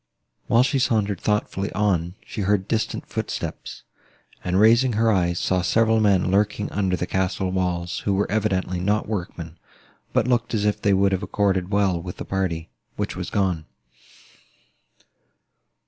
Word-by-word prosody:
While 120 +2 +5
she 135 +1 +1
sauntered 105 -5 +1
thoughtfully 105 -2 -1
on, 90 -4 0
she 105 - -5
heard 100 0 +1
distant 110 0 -1
footsteps, - - -5 0.6
and, 90 +1 +1
raising 115 +4 +5
her 110 +1 +3
eyes, 85 -3 +1
saw 90 +1 +1
several 110 +4 +3
men 100 -4 +3
lurking 105 +1 +1
under 95 -2 0
the 90 - -2
castle 95 0 -1
walls, 90 -2 -1
who 100 - -1
were 100 - +2
evidently 95 -4 0
not 105 +4 0
workmen, 90 -5 -5 0.5
but - - +1
looked 120 -1 +1
as 105 -1 0
if 105 - 0
they 100 -2 +3
would 100 +1 +3
have 95 -1 0
accorded 95 -2 0
well 100 -4 +1
with 90 0 -7
the - - -6
party 90 -4 -2 0.2
which - - -3
was - - -4
gone. 90 -6 0
100 Hz, 155 wpm, -23 LUFS, 90-105 Hz, 0.6 s, While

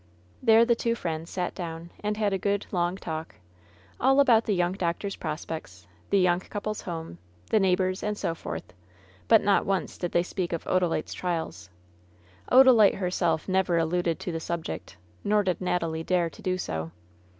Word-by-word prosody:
There 230 -1 +6
the 235 - +4
two 230 0 0
friends 165 -5 -4
sat 180 -1 -3
down 170 -1 -6
and 210 0 -2
had 210 -2 +1
a 190 - 0
good, 200 +1 0
long 175 0 0
talk 160 - -6 0.3
— 90 +2 -29
all 270 +2 +4
about 235 -5 +5
the 210 - +1
young 175 0 +1
doctor's 190 +2 -2
prospects, 155 - -6 0.2
the 200 - +3
young 180 -2 +3
couple's 210 +2 -5
home, 160 - -6 0.3
the 220 - +5
neighbors, 185 0 +1
and 210 0 -2
so 165 - -1
forth; 85 - -7 0.5
but - - +6
not 200 -1 +3
once 195 -1 -2
did 175 - -2
they 170 - +2
speak 180 -1 -3
of 170 - -3
Odalite's 180 -4 0
trials. 165 - -4 0.8
Odalite 250 -5 +7
herself 180 -4 0
never 190 -2 +2
alluded 165 0 0
to 180 - -3
the 165 - -3
subject, 160 - -5 0.3
nor 210 0 +3
did 185 -1 -1
Natalie 165 -3 -1
dare 175 -1 +1
to - - -14
do 185 -2 -1
so. 80 - -4
180 Hz, 175 wpm, -27 LUFS, 165-200 Hz, 0.8 s, Odalite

